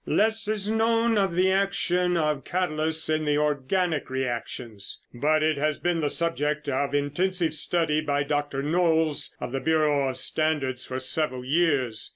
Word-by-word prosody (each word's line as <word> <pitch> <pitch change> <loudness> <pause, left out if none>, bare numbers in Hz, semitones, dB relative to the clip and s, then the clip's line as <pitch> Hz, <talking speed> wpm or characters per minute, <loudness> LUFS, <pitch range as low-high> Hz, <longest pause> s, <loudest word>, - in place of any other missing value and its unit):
"Less 220 +1 +1
is 210 -2 -1
known 225 +1 +2
of 195 -4 +1
the 185 +1 +3
action 180 -2 +1
of 150 -3 0
catalysts 160 -3 -1
in 155 0 0
the 150 -1 +1
organic 150 +3 0
reactions, 120 -4 -5
but 155 +5 +1
it 155 -2 +1
has 150 0 0
been 175 -2 0
the 145 - 0
subject 150 -3 -1
of 140 +1 -1
intensive 165 +4 0
study 155 0 +1
by 145 -1 0
Dr. 145 -1 -2
Knolles 160 -1 +1
of - - -5
the 135 - -2
Bureau 150 -3 +2
of 130 - -5
Standards 145 -5 0
for 130 - -4
several 130 -1 -2
years. 135 -7 +1
155 Hz, 160 wpm, -26 LUFS, 140-175 Hz, -, the